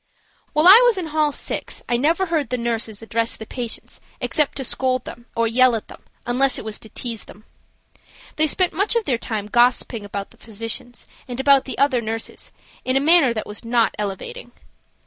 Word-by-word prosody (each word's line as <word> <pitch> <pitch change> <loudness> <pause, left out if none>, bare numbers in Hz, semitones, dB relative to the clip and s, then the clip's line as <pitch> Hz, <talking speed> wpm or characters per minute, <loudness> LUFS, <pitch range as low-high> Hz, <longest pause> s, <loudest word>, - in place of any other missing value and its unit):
While 305 +2 +3
I 410 +6 +10
was 480 -4 +4
in 365 - -2
hall 305 -1 +2
6 - - -4
I 240 - +1
never 325 +9 +2
heard 320 -7 -1
the 250 - -1
nurses 230 -2 -2
address 230 0 -1
the 220 - -8
patients 240 0 -6 0.2
except 300 -2 0
to 270 - -3
scold 255 0 -1 0.3
or 230 0 +2
yell 250 +1 +4
at 220 - -6
them, - - -13 0.2
unless 255 +2 +2
it - - -7
was 220 -1 -5
to 220 - -12
tease 230 -2 -4
the. 215 - -15 0.9
They 310 +1 +3
spent 365 +4 +1
much 400 +4 +1
of 465 -2 +1
their 245 -4 0
time 215 -4 -3
gossiping 240 0 +2
about 200 -1 -6
the - - -20
physicians 225 +2 -5 0.2
and 245 0 -6
about 275 0 +4
the 265 - -5
other 275 -4 +2
nurses 225 0 -4 0.3
in 255 - -1
a - - +4
manner 305 -2 +5
that 220 -2 -3
was 210 +2 -7
not 230 -1 +2
elevating. 210 - -5
245 Hz, 195 wpm, -21 LUFS, 225-290 Hz, 0.9 s, I